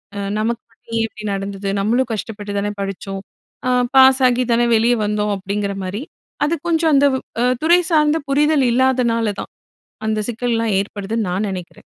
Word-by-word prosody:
அ - - -4 0.2
"நமக்கு 230 +2 -1
மட்டும் 230 0 -15
ஏன் 225 - +2
இப்படி 215 -1 -11
நடந்தது? 195 0 -4
நம்மளும் 240 +4 +1
கஷ்டப்பட்டு 205 -1 -5
தானே 205 +1 -1
படிச்சோம். 195 0 -5 0.5
அ - - +2 0.3
பாஸாகி 260 -1 +6
தானே 240 +1 +3
வெளியே 230 +2 +3
வந்தோம்." 210 0 0
அப்படிங்கிற 200 +1 -3
மாதிரி. 195 +5 -4 0.4
அது 330 +3 +1
கொஞ்சம் 325 -1 +2
அந்த 280 +1 +5
வ் 260 - -3 0.2
அ - - +3 0.2
துறை 340 +3 +5
சார்ந்த 305 -1 +4
புரிதல் 295 0 +3
இல்லாதனால 235 -3 +2
தான், - - -9 0.6
அந்த 215 0 0
சிக்கல்லாம் 230 -2 -1
ஏற்படுதுன்னு 205 +2 -3
நான் 200 +4 -1
நினைக்கிறேன். 180 -2 -8
225 Hz, 160 wpm, -19 LUFS, 205-260 Hz, 0.6 s, பாஸாகி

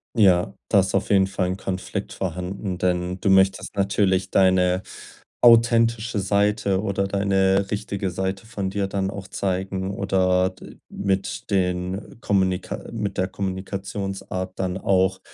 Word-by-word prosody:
Ja, 95 -6 +4 0.2
da 100 - +5
ist 95 - -2
auf 95 - 0
jeden 95 -1 +5
Fall 95 -1 -1
'n 95 +1 -2
Konflikt 95 -1 -4
vorhanden, 90 +1 -4
denn 90 0 -1
du 95 - +2
möchtest 95 +1 +3
natürlich 95 -1 +1
deine 95 -1 +3 0.6
authentische 115 -1 +4
Seite 100 0 +1
oder 100 -2 -1
deine 95 0 +1
richtige 100 -2 -3
Seite 95 +4 -3
von 100 -4 -3
dir 100 0 -1
dann 95 0 -2
auch 100 -1 -8
zeigen 95 0 -2
oder 95 -2 +2
d 95 - -13
mit 95 -1 -2
den 90 +1 -1
Kommunika 95 -2 0
mit 105 -4 -3
der 95 - +1
Kommunikationsart 95 0 -4
dann 95 -1 -2
auch 95 0 +1
95 Hz, 135 wpm, -23 LUFS, 95-100 Hz, 0.6 s, da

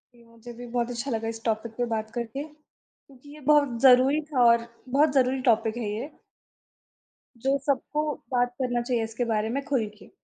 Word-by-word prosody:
जी, 235 - -20
मुझे 230 +1 -13
भी 245 - -8
बहुत 240 0 0
अच्छा 245 +2 -4
लगा 225 0 -2
इस 225 0 -5
टॉपिक 225 0 -1
पे 245 - 0
बात 220 0 -3
करके, 240 +4 -4 0.5
क्योंकि 280 +2 -18
ये 305 - -12
बहुत 285 -6 +4
ज़रूरी 265 +3 +6
था 250 -3 +3
और 235 0 +4 0.2
बहुत 285 +3 +3
ज़रूरी 260 -1 +2
टॉपिक 225 0 +2
है 225 -4 -3
ये 235 +8 -4 1.4
जो 275 +1 +3
सबको 290 +2 0 0.3
बात 245 0 +1
करना 245 -1 0
चाहिए 240 -2 -1
इसके 225 +2 -3
बारे 215 +1 0
में 275 +4 -2
खुल 260 -6 0
के। - - -16
245 Hz, 190 wpm, -26 LUFS, 230-270 Hz, 1.4 s, ज़रूरी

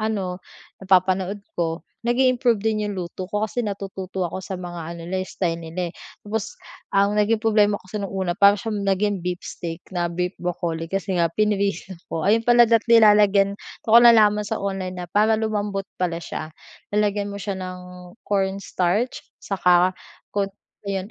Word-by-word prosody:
ano 195 -5 -2 0.4
napapanood 190 +1 +2 0.2
ko, 165 0 -1 0.2
nag 240 - +2
i-improve 250 -4 +2
din 215 -1 0
'yung 205 - -4
luto 180 +1 -5
ko 210 +2 -2
kasi 245 - -3
natututo 190 -2 -5
ako 170 - -5
sa 190 +1 -6
mga 175 -1 -7
ano 170 - -9
nila, 190 +1 -2
eh, - - -9
style 170 -3 -2
nila, 170 +1 -4
eh. - - -39 0.3
Tapos 220 +1 -3 0.4
ang 200 +1 +3
naging 215 +1 +2
problema 210 -2 +3
kasi 190 +3 -6
no'ng 200 - -4
una 185 -2 0
para 200 0 +7
siya 225 +1 -5
naging 200 0 0
beef 180 0 -3
steak 165 0 -6
na 175 -1 0
beef 180 +1 -2
broccoli 170 -2 -3
kasi 195 -2 -1
nga 170 - +4
pinrito 200 -2 0
ko. 160 - -3
Ayun 225 +3 +3
pala, 240 0 +7
dapat 230 0 +3
nilalagyan 205 -3 +5 0.3
do'n 220 - -3
ko 230 - +9
nalaman 210 -3 +6
sa - - -2
online 190 -2 -3
na - - -6
para 215 +2 +3
lumambot 205 -2 -2 0.2
pala 170 -2 -1
siya, 155 - -5 0.5
lalagyan 205 -1 +1
mo 200 - -6
siya 195 -1 -4
ng 185 0 -6 0.5
cornstarch 195 +2 0 0.2
saka 180 -2 +3 0.4
ko 200 -1 +1 0.4
ayon 195 +1 -3
195 Hz, 175 wpm, -23 LUFS, 180-210 Hz, 0.5 s, ko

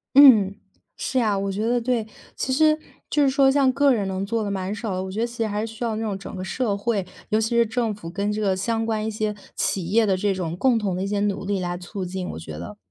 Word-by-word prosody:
嗯， 225 -9 +8 0.4
是 260 - -1
啊， 215 -4 +2
我 195 0 -1
觉 205 +3 -2
得 245 +1 +2
对。 235 -2 0 0.3
其 265 - -2
实， 310 +2 +4 0.3
就 295 - +2
是 275 - +4
说 270 0 +4
像 270 -1 +4
个 280 0 +4
人 205 -5 0
能 190 0 -2
做 225 +2 -1
的 205 - -2
蛮 190 0 -2
少 210 -1 -3
的， 185 - -2
我 190 - -6
觉 205 - -4
得 235 - +1
其 235 0 -11
实 225 - 0
还 210 +1 -2
是 - - -6
需 225 - -6
要 230 -2 0
那 220 - -3
种 205 -3 -2
整 195 - -9
个 185 - -5
社 205 +3 -1
会， 205 -1 -1 0.2
尤 215 0 +2
其 220 0 0
是 235 -1 +3
政 225 0 -1
府 180 -5 -8
跟 200 +4 -1
这 210 +1 -2
个 195 -2 +2
相 225 +4 -1
关 220 -1 -1
一 220 - -1
些 215 -1 -2 0.2
企 185 -4 0
业 220 +5 +3
的 195 -2 +2
这 200 +1 +1
种 175 -3 -3
共 240 +3 +3
同 200 -4 -1
的 185 - -2
一 - - -2
些 205 0 -1
努 205 -2 -1
力 200 0 0
来 175 -1 -2
促 185 +2 -6
进， 180 0 -4
我 - - -6
觉 80 -1 -8
得。 85 +6 -8
210 Hz, 305 characters per minute, -24 LUFS, 190-230 Hz, 0.4 s, 嗯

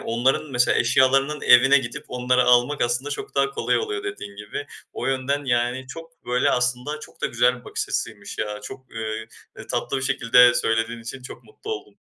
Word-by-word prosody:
onların, 130 +6 0
mesela 125 0 +3
eşyalarının 135 +4 +3
evine 135 +3 +6
gidip 120 -2 -6
onları 125 0 +1
almak 125 +4 +3
aslında 120 +4 -1
çok - - -6
daha 140 0 +2
kolay - - 0
oluyor 425 -2 -4
dediğin 250 - -7
gibi. 105 +7 -6 0.3
O - - -4
yönden, 135 +2 -1
yani, 125 +1 0
çok 165 +3 -12
böyle 125 +1 +2
aslında 125 +5 -1
çok - - -14
da - - +2
güzel 125 +1 +2
bir - - -23
bakış - - -4
açısıymış 105 -3 -4
ya, 105 0 -3
çok, 130 +4 -11
eee 110 0 -4 0.3
eee, - - -9
tatlı 135 - -2
bir 130 - -3
şekilde 125 -2 +5
söylediğin 115 +1 0
için 125 +3 -8
çok - - -11
mutlu 430 0 -10
oldum. 420 - -8
125 Hz, 190 wpm, -23 LUFS, 120-140 Hz, 0.3 s, evine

